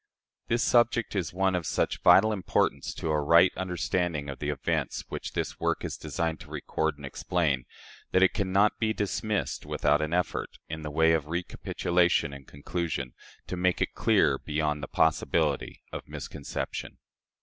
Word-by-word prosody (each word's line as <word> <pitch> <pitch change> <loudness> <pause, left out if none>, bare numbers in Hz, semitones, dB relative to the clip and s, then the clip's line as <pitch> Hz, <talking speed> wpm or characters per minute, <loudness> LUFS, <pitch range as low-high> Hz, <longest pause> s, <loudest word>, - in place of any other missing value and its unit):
This 120 +2 +1
subject 120 -2 +3
is 90 -5 -1
one 95 +1 +1
of 90 -3 -1
such - - 0
vital 110 +3 +6
importance 95 -3 0
to 80 - -2
a 75 -1 +2
right 85 +5 +5
understanding 90 -4 -1
of 70 - -9
the - - -2
events - - -1
which - - -5
this - - -3
work - - 0
is - - -4
designed 80 -1 -3
to 80 -2 -12
record 80 0 -2
and 70 - -9
explain, 70 -3 -1 0.5
that 95 - +4
it 95 - +4
can 95 -2 -1
not 100 +2 +3
be 110 -1 +1
dismissed 105 +1 -2
without 75 +1 +1
an 75 0 -2
effort 90 +1 -1
in 80 0 -5
the 75 - -5
way 80 +2 +4
of 80 -3 +1
recapitulation 85 -1 0
and 70 -1 -11
conclusion, 70 -3 -4 0.3
to - - -4
make 90 0 +1
it - - -1
clear - - +3
beyond 75 -1 -1
the 70 - -5
possibility 80 -1 +1
of - - -7
misconception. 70 -3 -5
85 Hz, 170 wpm, -28 LUFS, 75-95 Hz, 0.5 s, vital